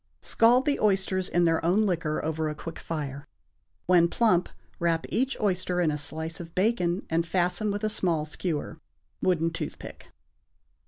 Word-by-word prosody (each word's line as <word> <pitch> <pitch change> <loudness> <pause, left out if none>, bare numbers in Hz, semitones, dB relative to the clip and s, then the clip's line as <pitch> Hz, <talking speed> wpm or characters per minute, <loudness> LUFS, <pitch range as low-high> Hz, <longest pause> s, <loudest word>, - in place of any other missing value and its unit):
= - - -47
Scald 245 +3 +5
the 290 -1 +1
oysters 190 -2 +1
in 175 0 +2
their 165 -1 +2
own 190 +6 +3
liquor 165 -6 -1
over 160 0 -1
a 150 - -4
quick 165 +2 -8
fire. 145 -3 -5 0.6
When 175 -1 +5
plump 180 -2 +2 0.3
wrap 165 -1 +1
each 265 +3 0
oyster 185 -3 0
in 165 -3 +2
a 150 - -2
slice 160 +3 -4
of 170 -1 -9
bacon, 185 -3 +1
and 165 +1 +1
fasten 180 +4 0
with 205 +1 -3
a - - +2
small 170 -7 0
skewer 160 0 -4 0.4
(wooden 165 -3 +2
toothpick). 165 - -7
175 Hz, 165 wpm, -27 LUFS, 160-195 Hz, 0.6 s, Scald